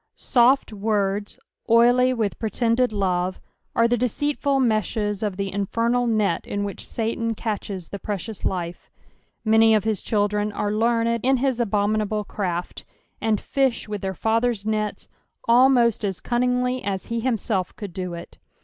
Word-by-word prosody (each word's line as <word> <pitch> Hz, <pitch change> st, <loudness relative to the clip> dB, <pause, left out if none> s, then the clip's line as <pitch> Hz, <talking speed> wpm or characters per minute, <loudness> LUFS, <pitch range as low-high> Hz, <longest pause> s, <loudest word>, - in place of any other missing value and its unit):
Soft 250 Hz, -1 st, +3 dB
words, 205 Hz, -1 st, -1 dB, 0.3 s
oily 245 Hz, +2 st, +5 dB
with 225 Hz, -5 st, -2 dB
pretended 235 Hz, +2 st, +1 dB
love, 185 Hz, -3 st, -1 dB, 0.4 s
are 230 Hz, -, +4 dB
ttie 240 Hz, 0 st, +1 dB
deceitful 280 Hz, +3 st, 0 dB
meshes 215 Hz, -3 st, 0 dB
of 205 Hz, -4 st, -2 dB
the 195 Hz, -1 st, -3 dB
infernal 230 Hz, +5 st, 0 dB
net 215 Hz, -6 st, +1 dB
in 205 Hz, 0 st, -2 dB
which 200 Hz, -1 st, -5 dB
Satan 230 Hz, 0 st, -2 dB
catches 200 Hz, -5 st, -4 dB
the 200 Hz, -, -6 dB
precious 205 Hz, +2 st, -5 dB
life; 175 Hz, -2 st, -3 dB, 0.6 s
many 220 Hz, 0 st, +5 dB
of 210 Hz, -, +2 dB
his 220 Hz, -4 st, -1 dB
children 210 Hz, 0 st, 0 dB
are 205 Hz, 0 st, -1 dB
learned 230 Hz, +1 st, +1 dB
in 265 Hz, +1 st, +3 dB
his 260 Hz, -1 st, 0 dB
abominable 210 Hz, -1 st, 0 dB
craft, 180 Hz, -4 st, -4 dB, 0.4 s
and 220 Hz, -2 st, +1 dB
fish 270 Hz, -5 st, 0 dB
with 210 Hz, -2 st, -4 dB
their 190 Hz, -1 st, -3 dB
father's 225 Hz, +1 st, 0 dB
nets, 215 Hz, -1 st, -2 dB, 0.4 s
almost 240 Hz, -2 st, +4 dB
as 195 Hz, -4 st, -2 dB
cunningly 250 Hz, +1 st, 0 dB
as 195 Hz, -1 st, -3 dB
he 235 Hz, -, 0 dB
himself 225 Hz, -6 st, -1 dB
could 200 Hz, -4 st, -7 dB
do 180 Hz, -1 st, -4 dB
it. 170 Hz, -, -11 dB
220 Hz, 150 wpm, -23 LUFS, 200-235 Hz, 0.6 s, oily